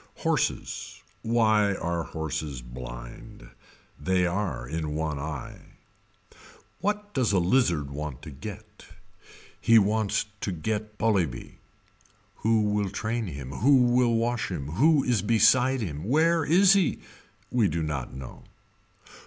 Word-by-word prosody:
Horses. - - -2 0.2
Why 110 -3 +2
are 85 -2 -2
horses 80 -5 -4
blind. - - -10 0.5
They 90 +4 +1
are 90 -8 -2
in 75 0 -3
one 75 -2 -2
eye. 75 -3 -6 1.2
What 210 +1 -2
does 125 -5 +1
a - - +4
lizard 85 - +2
want 75 -2 -6
to - - -8
get. 105 +8 -10 0.7
He 115 -1 +6
wants 105 0 +2
to 100 - -2
get 105 +4 -4
Polybe. 100 - -1 0.8
Who 110 -1 +2
will 105 -1 0
train 110 +3 -3
him, 70 -5 -7
who 135 - +4
will 120 -1 +3
wash 115 0 0
him. 75 -7 -5
Who 140 - +3
is 120 -6 +1
beside 125 +4 +4
him. 80 -5 -4
Where 160 +6 +3
is 185 +5 +6
he. 195 -5 +2 0.5
We 120 -4 +3
do 80 0 -2
not 70 -5 -3
know. 65 -1 -10
100 Hz, 130 wpm, -27 LUFS, 75-115 Hz, 1.2 s, He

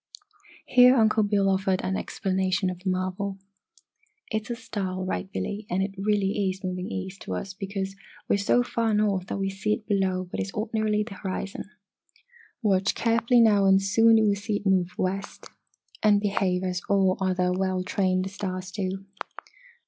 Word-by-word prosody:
Here 250 +1 +6
Uncle 220 -2 +4
Bill 205 -1 +2
offered 190 -1 +1
an 190 - -1
explanation 190 -2 -1
of 180 - -8
the 190 +1 -3
marvel. 185 +2 -2 0.9
"It's 220 +1 -2
a 240 - -2
star, 210 -6 -4
all 185 0 -4
right, 190 +1 -3
Billy, 205 +1 -4
and 185 +2 +1
it 195 0 -4
really 200 0 0
is 190 +1 -6
moving 185 +1 -3
east 190 -1 -6
to 95 - -4
us 190 - -5
because 195 0 -4 0.3
we - - +2
are 200 - +2
so 225 +4 +3
far 230 -3 0
north 200 -3 +1
that - - -3
we 195 0 -1
see 195 +2 -1
it 215 - -5
below 190 -3 +1
what - - -2
is 195 - -4
ordinarily 215 -1 0
the 210 -1 -9
horizon! 195 0 -5 1.0
Watch 195 -2 +2
carefully 230 +1 +3
now, 205 -3 +5
and 195 0 +6
soon 225 +3 +4
you 220 - +4
will 205 - +3
see 205 +1 -3
it 205 - -4
move 185 -2 +2
west 195 +2 -3 0.6
and 210 -1 +5
behave 195 -3 0
as 180 -1 -2
all 190 -2 +3
other 185 -1 +1
well 185 0 0
trained 185 0 0
stars 185 -2 -5
do." 190 -1 -4
195 Hz, 180 wpm, -26 LUFS, 185-210 Hz, 1.0 s, Here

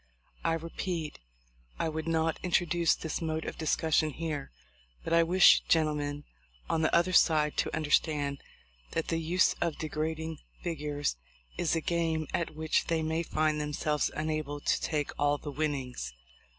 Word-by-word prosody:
I 165 - +2
repeat, 165 0 -4 0.6
I - - 0
would 160 0 -3
not 165 0 +1
introduce 175 -2 +2
this 160 +2 -4
mode 160 -1 -2
of - - -6
discus 160 0 0
sion 155 - +3
here; 155 -3 -4 0.5
but - - -2
I 170 - +6
wish 175 +3 +7
gentlemen 150 -2 +1 0.4
on 160 - +1
the 160 - +2
other 175 +2 +3
side 155 -4 +4
to - - 0
understand 145 -2 +1 0.5
that 165 - -1
the 165 - 0
use 175 +3 +3
of 170 -3 0
degrading 160 0 -3 0.2
figures 145 - -2 0.4
is 170 -2 +1
a 165 - 0
game 165 -1 0
at 170 -2 -1
which 155 0 0
they 165 -1 +1
may 160 +1 0
find 155 -2 0
themselves 150 0 0
unable 155 -2 -2
to - - +1
take 150 -3 -1
all 145 0 +3
the 145 - -7
winnings. 135 - -3
160 Hz, 155 wpm, -30 LUFS, 150-165 Hz, 0.6 s, wish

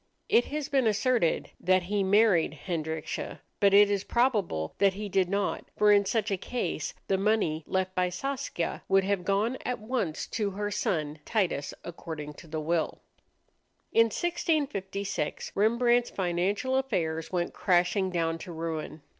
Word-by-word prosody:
It 240 - +5
has 295 -1 -3
been 270 -5 +2
asserted 220 -4 +1
that 185 0 +3
he 200 +3 -1
married 190 -7 +3
Hendrickje, 160 -3 -3 0.2
but 200 -1 +5
it 205 +1 +7
is 200 -1 0
probable 210 - 0
that 195 -1 +4
he 210 +1 -4
did 190 -2 +1
not, 200 0 -1
for 210 0 +5
in 200 -1 +5
such 215 +1 0
a 195 - +1
case 180 -7 -3
the 190 -1 +1
money 195 -7 +1
left 190 0 -1
by 180 -1 +1
Saskia 265 -2 -3
would 195 0 +4
have 195 -1 0
gone 205 +7 0
at 250 - -2
once 215 -8 -2
to 210 -3 -1
her 205 +1 -3
son 155 -6 -1
Titus, 175 -10 0
according 160 -3 -7
to 165 - -14
the 155 0 -4
will. 160 +1 -1 0.9
In 230 - +6
1656 225 - -2
Rembrandt's 235 +3 +3
financial 195 +8 0
affairs 165 -12 -1
went 175 -2 -1
crashing 185 +1 +2
down 165 -2 -1
to 175 - -8
ruin. 160 -2 -5
195 Hz, 155 wpm, -28 LUFS, 170-220 Hz, 0.9 s, it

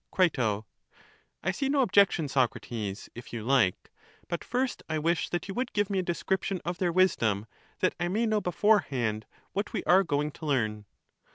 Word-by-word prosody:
Cri. 185 -3 +3 1.1
I 190 - +1
see 270 +8 -2
no 280 -1 +3
objection, 200 - +4
Socrates, 120 -6 -2
if 120 - -10
you 115 -2 -5
hke; 120 -8 +4 0.5
but 170 -1 -3
first 250 +2 -1
I 160 - 0
wish 165 +2 0
that 175 - -3
you 195 - -4
would 250 +2 -2
give 205 -1 0
me 195 - +1
a - - +2
description 190 +2 -1
of 175 +1 -3
their 180 -2 +1
wisdom, 115 - +2 0.4
that - - +3
I 175 - 0
may 215 +6 +1
know 215 -1 +1
beforehand 140 - +1 0.3
what 200 +1 -2
we - - -2
are 190 +2 +5
going 150 -3 -1
to 155 - -10
learn. 110 -7 0
175 Hz, 180 wpm, -29 LUFS, 125-195 Hz, 1.1 s, are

